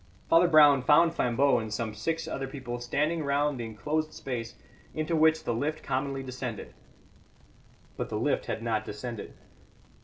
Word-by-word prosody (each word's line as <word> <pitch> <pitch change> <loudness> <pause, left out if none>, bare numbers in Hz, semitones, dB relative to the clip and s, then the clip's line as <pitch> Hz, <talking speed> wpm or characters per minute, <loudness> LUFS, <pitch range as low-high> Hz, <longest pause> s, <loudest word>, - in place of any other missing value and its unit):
Father 170 +2 +5
Brown 150 -4 +6
found 160 +5 +5
Flambeau 135 0 +2
and 110 -1 -5
some 110 +1 -3
six 165 +9 -3
other 135 -4 -4
people 130 -3 -6
standing 150 +6 -1
round 140 -1 0
the 120 - -3
enclosed 150 +9 -3
space 120 -3 -5 0.4
into 155 +2 -1
which 160 0 +4
the 120 - -1
lift 150 +6 -2
commonly 135 0 -2
descended. 125 -3 -6 1.2
But - - -3
the - - -2
lift - - 0
had 110 - -3
not 115 -2 0
descended. 110 +1 -7
135 Hz, 155 wpm, -28 LUFS, 120-155 Hz, 1.2 s, Brown